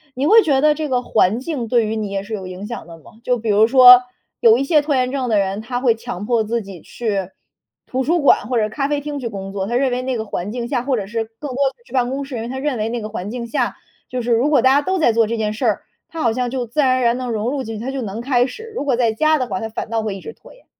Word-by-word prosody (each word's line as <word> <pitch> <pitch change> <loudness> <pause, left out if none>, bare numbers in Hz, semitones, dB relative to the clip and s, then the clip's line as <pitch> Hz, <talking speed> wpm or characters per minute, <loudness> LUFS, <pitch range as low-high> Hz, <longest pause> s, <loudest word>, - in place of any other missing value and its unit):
你 265 +2 -1
会 445 +8 +7
觉 285 -8 +2
得 305 +1 +5
这 310 0 -3
个 250 -1 +1
环 220 -1 +2
境 265 -3 -4
对 235 0 +2
于 215 +1 -2
你， 210 -2 -3
也 195 0 -3
是 215 +2 -8
有 190 -3 -5
影 185 +2 -7
响 235 -2 -7
的 165 -1 -11
吗？ 160 - -17
就 250 0 +1
比 225 -1 -4
如 210 +2 +5
说， 250 0 +9 0.4
有 225 0 +6
一 270 - 0
些 300 +2 +3
拖 290 -1 0
延 255 -1 +1
症 265 -2 -2
的 215 - +2
人， 195 0 0
他 245 +2 -4
会 245 -3 +4
强 225 -4 -7
迫 230 -1 +1
自 230 +2 -1
己 195 -3 -10
去 200 -6 -3 0.6
图 260 - -2
书 335 +4 +1
馆 285 - +4
或 245 0 0
者 215 -1 +1
咖 275 +5 -2
啡 290 0 -1
厅 290 0 -5
去 250 - -4
工 195 -3 -6
作， 195 -1 -3
他 240 - -2
认 260 +1 +2
为 250 +1 -1
那 255 0 -2
个 220 - -3
环 200 -1 -4
境 240 -1 -4
下 255 -3 0
或 265 0 0
者 205 -5 -3
是 225 +2 -3
更 290 +4 -6
多 - - -6 0.2
地 235 - -29
去 - - -21
办 250 -2 +1
公 275 +2 -3
室， 270 -3 -6
因 - - -4
为 230 - -5
他 260 +2 -5
认 280 -2 -1
为 215 0 -1
那 235 0 -3
个 215 - -5
环 205 -2 -5
境 240 +1 -5
下， 230 - -1 0.3
就 250 0 -3
是 240 +1 -2
如 235 +5 +3
果 285 -5 +4
大 260 +2 +5
家 285 - +4
都 375 +6 -1
在 310 -9 +3
做 225 -1 +2
这 230 - -2
件 215 -2 -1
事 215 - -3
儿， - - +1 0.3
他 330 - -6
好 230 - +2
像 245 +1 -1
就 250 -1 -3
自 240 +6 -5
然 260 -3 +4
而 - - -1
然 235 0 +2
地 255 -1 -4
融 225 +1 -1
入 280 -1 -2
进 225 -2 -6
去， 215 - -6
他 265 - -2
就 270 -1 -4
能 215 0 -5
开 245 -1 +2
始。 445 - -10
如 420 - -4
果 270 -3 +2
在 235 -2 +2
家 310 +8 +2
的 255 -3 -2
话， 245 - -3
他 225 - -4
反 220 0 -6
倒 225 0 0
会 215 -3 -3
一 195 - -9
直 - - -8
拖 - - -17
延。 - - -22
240 Hz, 350 characters per minute, -19 LUFS, 220-265 Hz, 0.6 s, 说